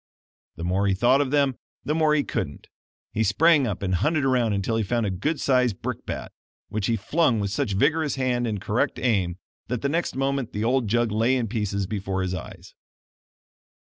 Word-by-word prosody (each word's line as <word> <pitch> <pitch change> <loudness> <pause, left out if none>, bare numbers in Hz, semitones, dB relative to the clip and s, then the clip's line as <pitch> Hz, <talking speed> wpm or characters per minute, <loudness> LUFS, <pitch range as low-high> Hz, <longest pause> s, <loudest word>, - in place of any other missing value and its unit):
The 85 - -7
more 95 +3 +1
he 95 - +2
thought 125 +7 +4
of 140 - 0
them, 140 -2 +1 0.3
the 150 - 0
more 155 -1 +3
he 145 - +2
couldn't. - - -4 0.4
He 110 - +1
sprang 140 - +4
up 100 -2 -4
and 95 -1 0
hunted 140 - +1
around 125 -5 +2
until 100 +3 -1
he - - +1
found 115 +2 0
a 100 - -1
good 145 - -1
size 125 -4 +2
brick - - -6
bat, - - -5 0.4
which 105 -2 -2
he 115 - +2
flung 130 - +1
with 100 -1 -2
such 100 0 -1
vigorous 150 +8 +2
hand 125 -2 0
and 105 -3 -2
correct 105 +4 0
aim 95 -8 0 0.3
that 125 +1 -3
the 140 - +1
next 165 0 -1
moment 135 -2 -1
the 105 - -2
old 125 0 +1
jug 120 +1 +1
lay 115 +5 +2
in 120 -3 0
pieces 105 -3 -2
before 95 -2 -2
his 95 0 -2
eyes. 90 - -8
115 Hz, 205 wpm, -25 LUFS, 100-135 Hz, 0.4 s, thought